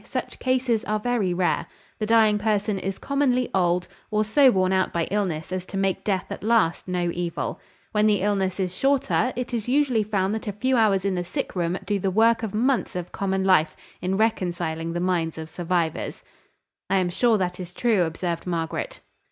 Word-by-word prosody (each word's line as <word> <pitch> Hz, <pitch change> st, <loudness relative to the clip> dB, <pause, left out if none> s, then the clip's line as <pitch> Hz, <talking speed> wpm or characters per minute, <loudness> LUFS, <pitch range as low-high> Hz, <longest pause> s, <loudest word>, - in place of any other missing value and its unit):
Such -, -, -5 dB
cases 255 Hz, -3 st, +1 dB
are 215 Hz, 0 st, 0 dB
very 220 Hz, -5 st, 0 dB
rare. 175 Hz, 0 st, 0 dB, 0.3 s
The 215 Hz, -, -1 dB
dying 220 Hz, -2 st, +4 dB
person 205 Hz, -1 st, 0 dB
is 195 Hz, 0 st, -3 dB
commonly 265 Hz, -3 st, 0 dB
old, 175 Hz, -1 st, +1 dB, 0.2 s
or 215 Hz, 0 st, +1 dB
so 265 Hz, +5 st, +5 dB
worn 185 Hz, -4 st, +2 dB
out 190 Hz, 0 st, +1 dB
by 170 Hz, -, 0 dB
illness 185 Hz, -6 st, -1 dB
as 185 Hz, -1 st, -2 dB
to 195 Hz, -, -5 dB
make 195 Hz, -1 st, 0 dB
death 190 Hz, -3 st, -1 dB
at -, -, -5 dB
last 220 Hz, -7 st, +2 dB
no 175 Hz, -1 st, -1 dB
evil. 175 Hz, -1 st, -3 dB, 0.3 s
When 210 Hz, 0 st, +3 dB
the 205 Hz, -3 st, +2 dB
illness 195 Hz, -2 st, 0 dB
is 185 Hz, -1 st, -2 dB
shorter, 270 Hz, +1 st, +1 dB
it 250 Hz, 0 st, -4 dB
is 230 Hz, 0 st, -2 dB
usually 260 Hz, -4 st, +3 dB
found 200 Hz, -2 st, 0 dB
that 220 Hz, 0 st, -4 dB
a 205 Hz, -, -2 dB
few 255 Hz, +6 st, 0 dB
hours 200 Hz, -5 st, +3 dB
in 195 Hz, -, +1 dB
the 180 Hz, -1 st, -1 dB
sick 175 Hz, -, -4 dB
room 175 Hz, 0 st, 0 dB
do 205 Hz, 0 st, 0 dB
the 195 Hz, -, 0 dB
work 225 Hz, +4 st, +3 dB
of 215 Hz, -3 st, -4 dB
months 250 Hz, 0 st, +1 dB
of 180 Hz, -1 st, -4 dB
common 190 Hz, -1 st, -1 dB
life, 170 Hz, -5 st, +3 dB, 0.3 s
in 190 Hz, +1 st, -1 dB
reconciling 175 Hz, -6 st, -1 dB
the 175 Hz, -, -2 dB
minds 175 Hz, -3 st, 0 dB
of 160 Hz, 0 st, -7 dB
survivors." 170 Hz, -1 st, -2 dB, 0.7 s
"I 195 Hz, -, +2 dB
am 185 Hz, -2 st, +2 dB
sure 230 Hz, +4 st, +3 dB
that 180 Hz, -2 st, -2 dB
is 180 Hz, -1 st, -6 dB
true," 220 Hz, 0 st, +2 dB
observed 170 Hz, +1 st, -2 dB
Margaret. 170 Hz, -, -3 dB
195 Hz, 200 wpm, -24 LUFS, 180-220 Hz, 0.7 s, so